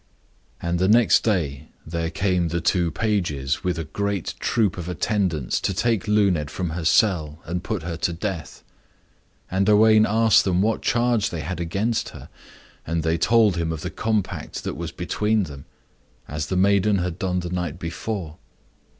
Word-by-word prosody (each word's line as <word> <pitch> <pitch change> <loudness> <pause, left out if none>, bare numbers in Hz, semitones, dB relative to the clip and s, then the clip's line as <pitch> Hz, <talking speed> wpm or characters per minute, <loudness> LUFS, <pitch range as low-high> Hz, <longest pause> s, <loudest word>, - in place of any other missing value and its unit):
And 85 0 -1
the 95 - +2
next 115 +2 +5
day 80 -9 -1 0.2
there 85 0 -2
came 90 -1 0
the 85 +1 -1
two 85 +1 +1
pages 80 -11 -1
with 90 -2 -1
a 80 - -2
great 100 +3 -3
troop 110 -6 +1
of 90 0 -5
attendants 90 - -1
to 95 - -1
take 115 0 0
Luned 100 -8 +2
from 90 +1 -3
her 85 +1 -4
cell, 80 -6 +2
and 90 +2 -3
put 105 -6 -3
her 85 0 -4
to 85 - 0
death. 85 -3 -5 0.9
And 95 +2 +1
Owain 110 +1 +6
asked 110 -2 +4
them 90 -2 +1
what 110 +3 +1
charge 120 -2 +1
they 85 -3 -4
had 85 +3 -4
against 100 +7 -1
her. - - -12 0.5
And 80 0 -2
they 80 0 0
told 110 -2 +4
him 85 -1 -1
of 80 -2 -5
the 90 - -4
compact 110 -3 -2
that - - -3
was - - -5
between 105 0 0
them; 70 -5 -9 0.6
as 75 +1 -4
the 95 - -1
maiden 100 +1 +3
had 90 -1 -3
done 90 -1 -1
the 90 0 -6
night 90 -3 -3
before. 85 -1 -5
90 Hz, 175 wpm, -23 LUFS, 80-105 Hz, 0.9 s, Owain